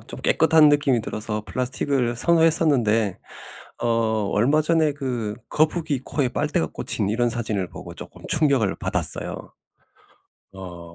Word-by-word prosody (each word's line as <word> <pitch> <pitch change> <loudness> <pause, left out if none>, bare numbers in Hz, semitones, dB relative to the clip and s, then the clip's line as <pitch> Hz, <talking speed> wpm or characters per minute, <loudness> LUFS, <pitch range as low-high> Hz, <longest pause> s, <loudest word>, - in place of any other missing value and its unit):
좀 - - -9
깨끗한 160 -2 +5
느낌이 145 -4 +2
들어서 105 0 -4
플라스틱을 125 -1 -1
선호했었는데 140 - +2 0.6
어 120 - -2 0.4
얼마 140 +9 +2
전에 160 -2 +2
그 125 -7 -4
거북이 155 -3 0
코에 140 -4 -1
빨대가 145 - -1
꽂힌 100 +6 -2
이런 120 +3 +1
사진을 110 -5 -3
보고 - - -10
쪼끔 - - -11
충격을 135 -10 +1
받았어요. - - -1 1.0
어 85 -3 -10
125 Hz, 295 characters per minute, -23 LUFS, 105-150 Hz, 1.0 s, 깨끗한